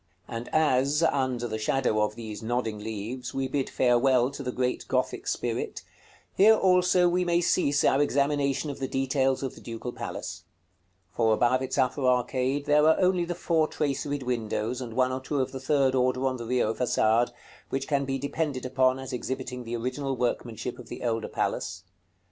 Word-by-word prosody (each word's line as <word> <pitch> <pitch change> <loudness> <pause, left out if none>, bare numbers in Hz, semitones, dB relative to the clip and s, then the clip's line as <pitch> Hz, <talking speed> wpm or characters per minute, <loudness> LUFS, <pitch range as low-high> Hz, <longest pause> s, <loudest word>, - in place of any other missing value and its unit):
§ - - -42 0.3
CXXXIII. - - -2
And 115 - -7
as, 150 0 +2
under 130 -6 +1
the 110 -1 -4
shadow 110 -1 +1
of 105 0 0
these 110 -2 -7
nodding 115 -2 -2
leaves, 110 +4 -5
we 135 0 0
bid 135 0 -2
farewell 125 +1 +3
to 140 - -7
the 125 -2 -3
great 125 0 -2
Gothic - - -1
spirit, - - -2 0.5
here 215 +3 +6
also 180 -2 +4
we 180 +1 +2
may 175 -1 +2
cease 145 -4 +2
our 135 - +4
examination 145 0 +1
of 140 - -9
the 135 - -2
details 135 0 0
of 130 - -3
the - - -14
Ducal 115 +1 -6
Palace; - - -6 0.7
for 110 +2 +2
above 125 +3 +2
its 130 +1 -3
upper 130 +1 +1
arcade 130 +2 +1
there 150 +1 +4
are 160 - +4
only 180 -1 +2
the 175 0 -3
four 165 -2 +1
traceried 145 -1 -2
windows, 120 0 -2
and 115 -3 -6
one 130 0 +2
or 130 - -2
two 145 +2 -2
of 130 - -1
the 135 - -6
third 135 0 +2
order 130 0 +1
on 130 -1 0
the 120 - -6
Rio 120 -2 +1
Façade, 120 -1 +2 0.4
which 135 0 -2
can 140 -2 +1
be 135 0 -2
depended 140 -1 -2
upon 130 0 +2
as 135 0 -7
exhibiting 125 0 -4
the 115 +1 -3
original 130 +3 -3
workmanship 120 -2 -3
of - - -11
the - - -7
older 115 -2 -1
palace. - - -2
130 Hz, 190 wpm, -27 LUFS, 120-140 Hz, 0.7 s, here